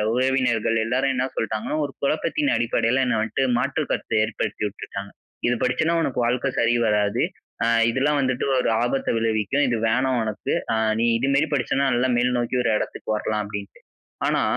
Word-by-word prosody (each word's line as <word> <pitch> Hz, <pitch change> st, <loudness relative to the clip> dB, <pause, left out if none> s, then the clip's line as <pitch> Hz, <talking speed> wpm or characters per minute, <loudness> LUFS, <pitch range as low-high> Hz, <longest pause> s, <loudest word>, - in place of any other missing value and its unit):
உறவினர்கள் 125 Hz, -3 st, +1 dB
எல்லாரும் 130 Hz, +4 st, +1 dB
என்ன 130 Hz, 0 st, 0 dB
சொல்லிட்டாங்கன்னா, 110 Hz, +6 st, -2 dB
ஒரு 140 Hz, -, -7 dB
குழப்பத்தின் 290 Hz, -, 0 dB
அடிப்படைல 120 Hz, +2 st, +1 dB
என்ன 125 Hz, -2 st, +1 dB
வந்துட்டு 120 Hz, +4 st, 0 dB
மாற்று -, -, -1 dB
கருத்து 110 Hz, -, -1 dB
ஏற்படுத்திவுட்டுட்டாங்க. 100 Hz, -2 st, -4 dB, 0.4 s
"இது 120 Hz, -, +2 dB
படிச்சன்னா 160 Hz, +6 st, +1 dB
உனக்கு 130 Hz, -5 st, -2 dB
வாழ்க்க 125 Hz, +3 st, 0 dB
சரி 120 Hz, 0 st, +3 dB
வராது. 105 Hz, +1 st, +1 dB, 0.4 s
அ -, -, +2 dB, 0.2 s
இதெல்லாம் 145 Hz, +4 st, +1 dB
வந்துட்டு 130 Hz, -2 st, 0 dB
ஒரு -, -, +1 dB
ஆபத்த 130 Hz, +3 st, -1 dB
விளைவிக்கும். 115 Hz, +5 st, +1 dB
இது 120 Hz, -, +1 dB
வேணாம் 130 Hz, +1 st, +1 dB
உனக்கு. 110 Hz, -1 st, -3 dB, 0.2 s
அ -, -, +2 dB, 0.3 s
நீ 120 Hz, -, +3 dB
இதுமேரி 140 Hz, +5 st, +1 dB
படிச்சனா 135 Hz, 0 st, 0 dB
நல்லா 125 Hz, +2 st, +1 dB
மேல்நோக்கி 125 Hz, 0 st, +1 dB
ஒரு 115 Hz, -, +2 dB
இடத்துக்கு -, -, -6 dB
வரலாம்" 105 Hz, 0 st, -2 dB
அப்டின்ட்டு. 100 Hz, -1 st, -8 dB, 0.5 s
ஆனா, -, -, +1 dB
125 Hz, 155 wpm, -23 LUFS, 110-135 Hz, 0.5 s, சரி